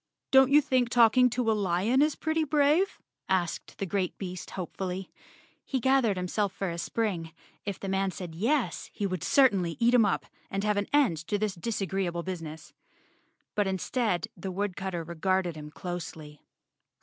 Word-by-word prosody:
"Don't 265 -1 +7
you 295 +2 +7
think 255 -3 +1
talking 245 +1 +5
to 240 -1 0
a - - +4
lion 205 +5 +2
is 300 0 +3
pretty 315 0 0
brave?" 305 +6 +2 0.3
asked 180 -3 -1
the 195 - -2
great 190 0 -1
beast 180 -4 -6
hopefully. 185 +1 -4 0.5
He 265 - -2
gathered 250 -5 +3
himself 190 +2 -1
for 195 -3 -3
a 170 - -5
spring. 175 -5 -2 0.3
If 200 -3 -4
the 195 - -5
man 195 0 +1
said 180 -2 -7
yes, 235 - 0
he 205 - -2
would 185 -4 -2
certainly 200 -11 +3
eat 240 +1 +4
him 245 -2 +6
up - - 0 0.2
and 195 0 -2
have 210 -1 +1
an 205 - 0
end 280 - +3
to 205 - 0
this 210 -1 -1
disagreeable 190 -3 -2
busi¬ 185 -2 -4
ness. 160 0 -9 0.8
But 205 -2 +1
instead, 190 0 -1
the 190 +2 -5
woodcutter 190 -2 -3
regarded 175 +1 0
him 150 -1 -8
closely. 160 -4 -7
195 Hz, 170 wpm, -28 LUFS, 180-240 Hz, 0.8 s, Don't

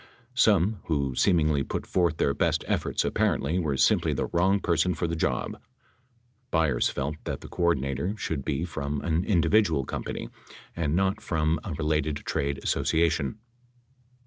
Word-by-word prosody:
Some 105 -4 +3
who 70 -5 0
seemingly 75 -2 +3
put - - -4
forth 85 -4 +1
their 70 - +2
best 80 +1 0
efforts - - 0
apparently 80 +6 +1
were 75 -6 -1
simply - - +3
the - - -1
wrong 95 +4 +2
person 85 0 +1
for 85 - -2
the 85 0 -1
job. 80 - -2 0.9
Byers 80 -7 +2
felt 75 +3 -3
that - - -4
the - - -9
coor 85 -1 +1
dinator 70 +10 -3
should 80 -8 -3
be 75 +4 -1
from 70 -4 -3
an 85 +1 0
individual 85 - +2
company - - -5 0.5
and 80 -2 0
not 95 +3 +1
from 80 -1 0
a - - -6
re 75 +1 -3 0.2
lated 75 0 -4
trade 70 0 -1
association. 80 0 +1
80 Hz, 155 wpm, -27 LUFS, 70-90 Hz, 0.9 s, Some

